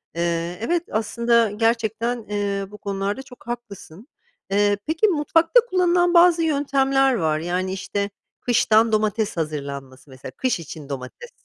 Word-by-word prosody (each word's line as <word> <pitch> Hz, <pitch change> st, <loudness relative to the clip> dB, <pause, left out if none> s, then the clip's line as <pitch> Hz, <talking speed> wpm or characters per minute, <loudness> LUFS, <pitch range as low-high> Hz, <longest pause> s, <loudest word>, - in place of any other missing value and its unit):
Eee, 170 Hz, +1 st, -1 dB
evet, 340 Hz, +8 st, 0 dB
aslında 230 Hz, 0 st, +1 dB
gerçekten, 230 Hz, +1 st, -1 dB
eee, 200 Hz, -1 st, -2 dB
bu 210 Hz, -, -10 dB
konularda 200 Hz, +4 st, -3 dB
çok 250 Hz, -2 st, -16 dB
haklısın. 220 Hz, -, -8 dB, 0.4 s
Eee, 205 Hz, 0 st, +3 dB
peki 320 Hz, +7 st, +2 dB
mutfakta 330 Hz, +5 st, +3 dB
kullanılan 355 Hz, -1 st, +2 dB
bazı 345 Hz, -1 st, +6 dB
yöntemler 275 Hz, -3 st, +2 dB
var, 160 Hz, -6 st, 0 dB
yani, 180 Hz, +3 st, -2 dB
işte, 200 Hz, +1 st, -3 dB, 0.3 s
kıştan 225 Hz, -2 st, +3 dB
domates 215 Hz, -2 st, 0 dB
hazırlanması 140 Hz, -3 st, -5 dB
mesela, 130 Hz, 0 st, -10 dB
kış 245 Hz, -, -1 dB
için 155 Hz, -2 st, -9 dB
domates. 135 Hz, -, -7 dB
215 Hz, 130 wpm, -22 LUFS, 175-270 Hz, 0.4 s, bazı